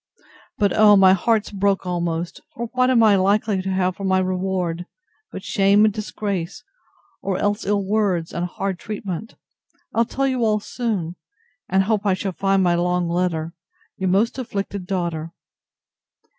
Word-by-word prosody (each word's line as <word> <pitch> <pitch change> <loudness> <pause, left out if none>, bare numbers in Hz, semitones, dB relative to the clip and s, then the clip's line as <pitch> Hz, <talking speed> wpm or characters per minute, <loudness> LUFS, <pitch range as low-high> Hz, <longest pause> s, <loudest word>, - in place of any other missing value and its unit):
—But, 205 -3 +2
oh! 210 -1 +7
my 190 -1 +7
heart's 215 +3 +1
broke 200 -1 0
almost; 170 -1 -3
for 235 0 -4
what 255 0 +3
am 240 -3 +4
I 210 -2 +6
likely 200 +1 +2
to 190 - -4
have 185 -1 0
for 195 - -8
my 190 -1 +2
reward, 185 -2 -1 0.4
but - - -7
shame 200 +1 +4
and 215 - +2
disgrace, 200 -4 -4 0.6
or 195 -2 -1
else 205 -1 -1
ill 200 -1 +1
words, 195 -5 0
and 175 +1 -2
hard 190 0 -4
treatment! 210 0 -6 0.6
I'll 230 +1 +3
tell 275 +3 -1
you 260 -3 0
all 215 -1 +2
soon, 205 -7 -3 0.5
and 190 0 +3
hope 210 0 0
I 200 -3 +2
shall 190 +1 -3
find 195 +1 +1
my 175 -1 +3
long 180 0 +1
letter. 170 -2 -1 0.4
Your 190 -1 -1
most 220 +7 +1
afflicted 200 -5 -4
DAUGHTER. 170 -4 -3
195 Hz, 160 wpm, -22 LUFS, 180-210 Hz, 0.6 s, oh